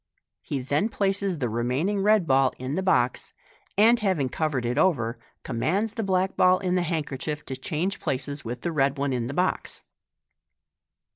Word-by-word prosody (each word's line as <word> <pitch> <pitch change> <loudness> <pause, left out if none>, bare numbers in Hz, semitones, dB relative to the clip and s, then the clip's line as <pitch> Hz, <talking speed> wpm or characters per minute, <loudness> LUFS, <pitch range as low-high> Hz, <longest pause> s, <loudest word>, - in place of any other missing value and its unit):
He 135 -3 -4
ths 145 - +1
places 195 -3 0
the 130 -4 -1
remaining 125 - 0
red 210 -2 +4
ball 135 -2 +3
in 130 +2 -4
the 185 - 0
box, 125 -10 +1 0.4
and 230 +3 +6
having 185 - +1
covered 140 -4 -1
it 125 +4 0
over, 130 -10 +2 0.3
commands 195 - -1
the 230 - -3
black 190 -2 0
ball 185 0 +5
in 185 -2 -1
the 180 - +2
handkerchief 150 -3 -3
to 130 - -5
change 160 +8 -2
places 140 +2 -3
with 120 +1 -5
the 170 - -2
red 140 -2 +1
one 140 -1 0
in 120 -2 -1
the 135 - -4
box. 185 +1 -1
155 Hz, 170 wpm, -26 LUFS, 130-190 Hz, 0.4 s, and